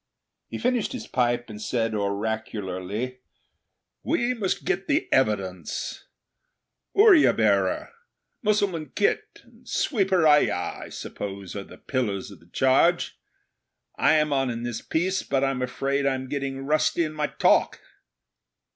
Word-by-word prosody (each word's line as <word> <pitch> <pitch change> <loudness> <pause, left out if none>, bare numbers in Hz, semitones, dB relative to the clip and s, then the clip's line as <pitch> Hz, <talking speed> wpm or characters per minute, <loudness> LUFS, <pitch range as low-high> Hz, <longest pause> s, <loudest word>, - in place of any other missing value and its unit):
He - - -6
finished 245 -2 0
his 255 - -5
pipe 120 -1 0
and 105 -1 -9
said 115 0 -1
oracularly, 105 +2 -3 0.8
'We 250 -6 0
must 210 -6 -2
get 175 - +1
at 195 - -25
the 300 +3 +1
evidence. 100 -8 -1 0.9
Oorya 395 -6 +7
bearer, 100 -4 +1 0.5
Mussulman 200 -7 0
khit 425 - 0
and - - -19
sweeper 195 - +2
ayah, 150 -11 +3
I - - -11
suppose, 100 -2 -7
are 100 - -4
the - - -13
pillars 105 -7 -2
of 95 - -13
the 85 - -22
charge. 135 +7 +2 0.8
I 155 - +4
am 150 -1 +2
on 135 -2 +1
in 120 -1 -4
this 120 -2 -4
piece; 185 +4 0
but 135 -1 0
I'm 135 -2 0
afraid 140 +2 -1
I'm 130 -1 -2
getting 135 -1 -3
rusty 155 +3 +2
in 155 -1 -3
my 150 -1 -1
talk.' - - +2
135 Hz, 140 wpm, -25 LUFS, 110-170 Hz, 0.9 s, Oorya